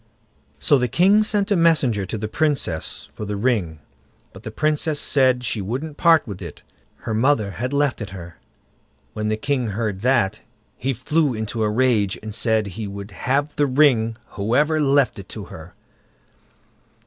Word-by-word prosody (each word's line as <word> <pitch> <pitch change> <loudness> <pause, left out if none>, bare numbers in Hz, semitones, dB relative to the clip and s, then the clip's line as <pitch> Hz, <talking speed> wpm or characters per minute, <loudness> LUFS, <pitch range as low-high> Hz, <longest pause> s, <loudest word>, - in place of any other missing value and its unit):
So 140 - +3
the 125 - +1
king 190 - +4
sent 210 -1 0
a - - +4
messenger 140 - +2
to 110 - -4
the 110 +1 -4
Princess 130 - -2
for - - -7
the 105 0 -3
ring; 100 - -1 0.5
but - - -12
the - - -7
Princess 155 0 0
said 130 -3 +3
she 110 -3 -2
wouldn't 135 +10 -4
part 165 -1 +4
with 100 -5 -8
it, 85 -4 -9 0.4
her 110 - -2
mother 110 -3 +2
had 125 +6 -4
left 140 -3 0
it 105 - -5
her. 90 -2 -10 0.7
When 105 0 -3
the 110 0 0
king 135 0 -1
heard 105 -2 -3
that, 115 -4 +1 0.4
he 135 +4 -2
flew 145 +2 0
into 110 +1 -4
a 105 - +2
rage, 110 -4 +1
and 110 -1 -6
said 110 -1 +1
he 105 +2 -6
would 100 +1 -8
have 140 +9 -1
the 145 - +3
ring, 125 -5 +3
whoever 145 +10 +1
left 140 -5 +2
it 100 - -11
to 105 -3 -7
her. 80 +2 -11
120 Hz, 170 wpm, -22 LUFS, 105-145 Hz, 0.7 s, king